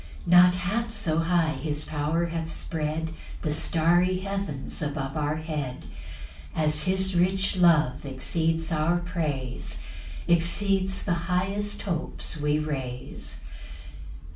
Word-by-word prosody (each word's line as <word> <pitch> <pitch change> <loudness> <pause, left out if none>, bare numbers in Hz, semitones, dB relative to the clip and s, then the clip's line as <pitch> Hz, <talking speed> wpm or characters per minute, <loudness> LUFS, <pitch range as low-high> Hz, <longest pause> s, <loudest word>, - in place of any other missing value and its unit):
2 - - -2
Not 180 0 +8
half 200 +6 -1
so 170 -8 0
high 165 -1 +2
his 150 +1 -2
power 155 +3 0
hath 165 -1 -3
spread 160 0 -2 0.3
The 155 - 0
starry 175 +4 +2
heavens 195 -9 -4
above 145 -2 -3
our 150 0 0
head, 150 -5 -4 0.7
As 155 -1 +2
his 190 0 +2
rich 190 +3 +2
love 160 -6 +4
exceeds 160 +4 -1
our 160 +2 +2
praise, 155 -8 -3 0.5
Exceeds 190 +3 +2
the 185 - +1 0.2
highest 195 +3 0
hopes 170 -3 -3
we 150 -1 +1
raise. 135 -5 -5
165 Hz, 115 wpm, -27 LUFS, 150-180 Hz, 0.7 s, Not